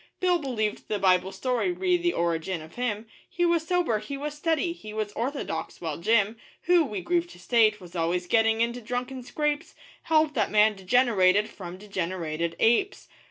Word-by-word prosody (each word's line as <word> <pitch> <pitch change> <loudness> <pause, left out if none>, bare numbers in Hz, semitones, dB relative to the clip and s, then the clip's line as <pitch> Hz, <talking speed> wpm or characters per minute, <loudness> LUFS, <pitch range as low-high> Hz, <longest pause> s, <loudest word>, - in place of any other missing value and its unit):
Bill 360 -1 +2
believed 230 -7 -2
the 210 - -1
Bible 185 -1 +3
story 255 - -1
re 360 0 +1
the 350 0 +1
origin 170 +1 -1
of 160 - -14
him 230 -3 -2 0.2
He 350 -2 0
was 335 -2 +1
sober, 350 -12 +1
he 245 +7 -6
was 295 +1 -4
steady, 325 +2 0
he 215 -11 -10
was 215 -1 -2
orthodox; 235 - -4
while 160 -3 -4
Jim, 215 +3 +2 0.3
Who, 350 -1 +4
we 210 -9 -4
grieve 345 - 0
to - - -15
state, 220 -3 +3
was 180 -2 -13
always 175 +2 0
getting 225 +3 +3
into 235 +1 -1
drunken 250 +3 -4
scrapes, 300 +4 -2 0.3
Held 310 -1 +3
that 220 -7 +1
man 215 0 +4
degenerated 205 -1 +3
from 180 -2 -8
degenerated 170 -4 -3
apes. 380 - +1
225 Hz, 175 wpm, -26 LUFS, 190-300 Hz, 0.3 s, Who